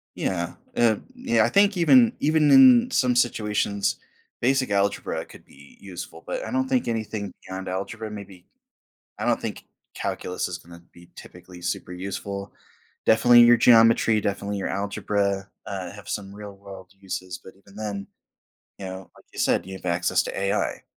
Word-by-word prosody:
Yeah, - - -2 0.2
uh, 115 -3 +3 0.2
yeah, 250 -1 +2
I - - +1
think 200 0 +3
even 235 +7 +5
even 155 0 +3
in 255 -2 +7
some 125 - +2
situations, 105 -4 0 0.5
basic 130 -1 +2
algebra 100 0 -1
could - - -16
be 70 0 -18
useful, 90 -3 -9
but - - -3
I - - -6
don't 260 +1 0
think 260 -2 0
anything 110 -3 -3
beyond 95 0 -6
algebra, 105 +4 -5
maybe 100 -4 -10 0.7
I - - -4
don't - - +1
think - - -6 0.3
calculus 90 - -3
is 90 - -5
gonna 85 -1 -15
be 85 0 -17
typically 90 -1 -13
super 90 +1 -4
useful. 100 +2 -6 0.5
Definitely 120 +2 +6
your 120 0 +7
geometry, 115 -2 +5
definitely 100 0 -2
your 95 - -3
algebra, 100 0 -2 0.2
uh, 95 -3 -5
have 105 0 -13
some 100 -1 -5
real 105 -1 -9
world 95 -1 -12
uses, 95 -2 -6
but 95 - -13
even 100 0 -20
then, 105 -2 -5 0.7
you 95 - -6
know, 95 0 -8
like - - -19
you - - -12
said, - - +1
you 95 - -7
have 95 - -11
access 85 +1 +1
to - - -6
AI. 100 0 -1
100 Hz, 165 wpm, -24 LUFS, 95-120 Hz, 0.7 s, in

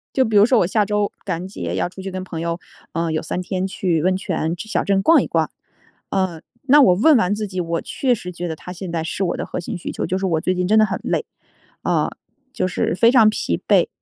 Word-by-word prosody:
就 265 - +4
比 220 -2 0
如 205 +2 +7
说 250 -1 +4
我 180 - +3
下 210 +3 +2
周 210 0 0
感 175 -4 -2
恩 185 - -6
节 195 - -5
要 - - 0
出 190 +2 -10
去 195 - -5
跟 185 0 -5
朋 165 -3 -6
友， 170 0 -2 0.3
呃 165 -1 -1
有 155 - -1
3 175 - -3
天 185 +1 -2
去 180 -4 -1
温 185 +2 +2
泉 170 -4 -2
小 220 +5 -2
镇 195 -1 +2
逛 330 +11 +5
一 - - -3
逛。 - - 0 0.6
呃， 185 -4 -1 0.3
那 290 +2 +7
我 190 -10 +6
问 275 - +5
完 205 -3 +2
自 210 0 -3
己， 185 -2 -4
我 165 -1 -1
确 255 -3 0
实 180 -5 -7
觉 175 0 -5
得 160 - -4
它 180 - -9
现 185 0 -7
在 165 -1 -2
是 175 +4 -3
我 175 - -1
的 - - -3
核 - - -4
心 - - -5
需 - - -5
求， - - -3
就 185 - -1
是 190 - -1
我 165 -4 +1
最 185 - 0
近 180 0 -1
真 215 +4 +4
的 215 - +6
很 195 - -3
累， - - -1 0.6
啊， - - +1 0.4
就 185 - -1
是 180 - -1
非 230 +6 +5
常 225 -4 +6
疲 85 - -2
惫 - - +4
185 Hz, 280 characters per minute, -21 LUFS, 175-210 Hz, 0.6 s, 如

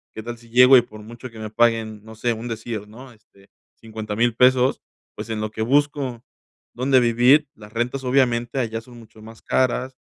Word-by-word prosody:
¿Qué 110 - -7
tal 120 0 -7
si 115 -1 -19
llego 125 +2 +7
y 120 - +6
por 110 -2 -13
mucho 120 +4 -10
que 115 - -15
me 110 -1 -7
paguen, 110 -2 0
no 110 0 -12
sé 115 +2 -1
un 115 +2 -7
decir, 110 -2 -6
¿no? 125 +4 -13
Este, 100 -2 -25 0.3
$50,000 110 +1 -3
pesos, 125 +1 +3 0.3
pues - - -8
en 110 -1 -3
lo 110 0 -4
que 110 - -6
busco, 135 -1 0 0.5
donde 130 +1 +3
vivir, 125 +5 +4
las 105 0 -14
rentas 125 +3 -2
obviamente 125 -1 +1
allá 115 -2 -3
son 120 +1 -16
mucho 110 -1 -17
más 110 +1 -13
caras. 130 0 0
120 Hz, 195 wpm, -22 LUFS, 110-125 Hz, 0.5 s, llego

